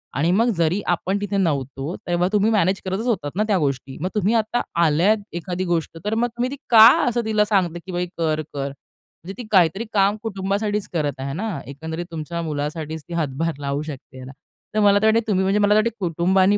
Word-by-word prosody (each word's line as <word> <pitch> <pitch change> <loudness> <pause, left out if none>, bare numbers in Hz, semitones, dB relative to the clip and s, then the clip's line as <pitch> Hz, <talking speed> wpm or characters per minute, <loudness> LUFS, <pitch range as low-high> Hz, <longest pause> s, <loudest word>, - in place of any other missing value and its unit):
आणि 150 +5 +1
मग 230 +6 +3
जरी 170 +4 +1
आपण 180 +3 0
तिथे 205 -1 -2
नव्हतो 140 -2 -1
तेव्हा 175 0 +1
तुम्ही 210 +2 +3
मॅनेज 195 -3 +2
करतच 190 +5 -2
होतात 150 -11 -1
ना 210 - +2
त्या 200 -3 +2
गोष्टी. 135 -2 -2
मग 185 - -1
तुम्ही 210 +2 +2
आता 225 +2 +1 0.2
आल्यात 170 +8 +3 0.2
एखादी 180 +1 -3
गोष्ट 165 -2 -2
तर 210 - 0
मग 235 +2 +2
तुम्ही 240 +2 -3
ती - - -4 0.2
का 220 -1 +10 0.2
असं 240 -1 -1
तिला 215 -1 +2
सांगता, 185 -5 +1
की 190 - -7
बाई 180 0 -1
कर, 155 -2 0
कर? 140 -1 -2
म्हणजे 160 +6 -14
ती 240 - -8
काहीतरी 190 +3 +3
काम 200 0 +3
कुटुंबासाठीच 205 0 -2
करत 145 -5 -1
आहे 135 +1 -4
ना. 190 -4 -3
एकंदरीत 160 +5 -6
तुमच्या 165 +1 -4
मुलासाठीच 155 +1 -4
ती - - -6
हातभार 160 0 -1
लावू 140 0 -2
शकते 140 -3 -9
ह्याला. 130 0 -9 0.4
तर - - +3
मला 205 -1 +5
तर - - +2
वाटतं 225 +1 +2
तुम्ही 190 -3 +2
म्हणजे 195 +2 +2
मला 205 0 +4
तर - - +6
वाटतं 230 +1 0
कुटुंबाने 185 +4 +3
185 Hz, 210 wpm, -22 LUFS, 155-210 Hz, 0.4 s, का